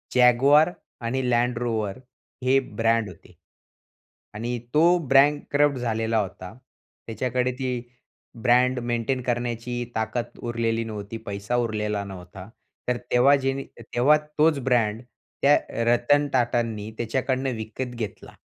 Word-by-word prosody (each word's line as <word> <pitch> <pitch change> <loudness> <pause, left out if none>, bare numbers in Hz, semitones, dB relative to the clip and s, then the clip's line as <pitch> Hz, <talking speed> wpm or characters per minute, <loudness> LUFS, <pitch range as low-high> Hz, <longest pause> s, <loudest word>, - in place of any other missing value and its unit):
Jaguar 135 +7 +5 0.3
आणि 120 +3 -1
Land 120 0 +1
Rover 110 -1 -2 0.4
हे 135 +1 +4
brand 115 -3 0
होते 85 - -15 1.0
आणि 120 +3 -3 0.2
तो 170 +4 +5
बँकरप्ट 145 0 +3
झालेला 115 -1 -1
होता. 95 -1 -5 0.5
त्याच्याकडे 125 +3 -1
ती 125 -2 -3 0.6
ब्रँड 125 +1 +4
मेंटेन 120 +2 -1
करण्याची 120 0 -2
ताकद 110 +2 -3
उरलेली 115 -1 -1
नव्हती. 105 0 -6
पैसा 100 +3 -3
उरलेला 105 -3 -1
नव्हता. 95 0 -10 0.4
तर 125 - +1
तेव्हा 130 +4 +6
जेनी 135 +1 -1 0.2
तेव्हा 120 +6 +3 0.2
तोच 150 -2 +4
ब्रँड 115 -4 +1 0.4
त्या 145 +1 +6
अ, 115 - -2
रतन 145 +4 +3
टाटांनी 115 -3 0
त्याच्याकडनं 130 +2 -1
विकत 120 +3 -5
घेतला. 110 -3 -7
120 Hz, 115 wpm, -25 LUFS, 110-130 Hz, 1.0 s, तेव्हा